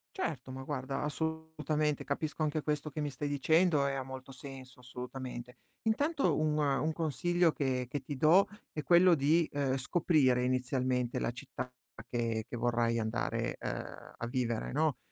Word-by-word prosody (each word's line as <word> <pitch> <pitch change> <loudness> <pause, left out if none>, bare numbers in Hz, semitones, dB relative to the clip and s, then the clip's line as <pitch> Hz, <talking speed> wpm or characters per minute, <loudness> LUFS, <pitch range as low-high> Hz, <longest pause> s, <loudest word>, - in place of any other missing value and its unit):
Certo, 145 - -3
ma 130 0 -6
guarda, 135 -1 -3
assolutamente, 155 -1 -1
capisco 155 +2 -3
anche 155 0 0
questo 150 0 -1
che 155 +1 -4
mi 145 -1 -2
stai 140 +2 -3
dicendo 150 +2 +3
e 140 - 0
ha 135 - -2
molto 130 0 -8
senso, 130 -1 -10
assolutamente. 125 0 -7 0.3
Intanto 285 +7 +2
un 155 -1 +1
un 145 +1 +2
consiglio 165 +3 +2
che 130 -4 -1
che 140 +3 -3
ti 140 +2 -5
do 165 +8 +6 0.2
è 155 - -3
quello 175 +3 +6
di, 155 +2 +3
ehm, 140 -2 0
scoprire 135 -3 +3
inizialmente 125 -1 0
la - - 0
città 120 +1 -6 0.4
che 115 -2 -1
che - - -6
vorrai 115 -1 +1
andare, 110 +1 -1
ehm, - - -6
a 120 - -3
vivere, 120 -2 -1
no. 155 -1 +1
140 Hz, 160 wpm, -32 LUFS, 125-155 Hz, 0.4 s, do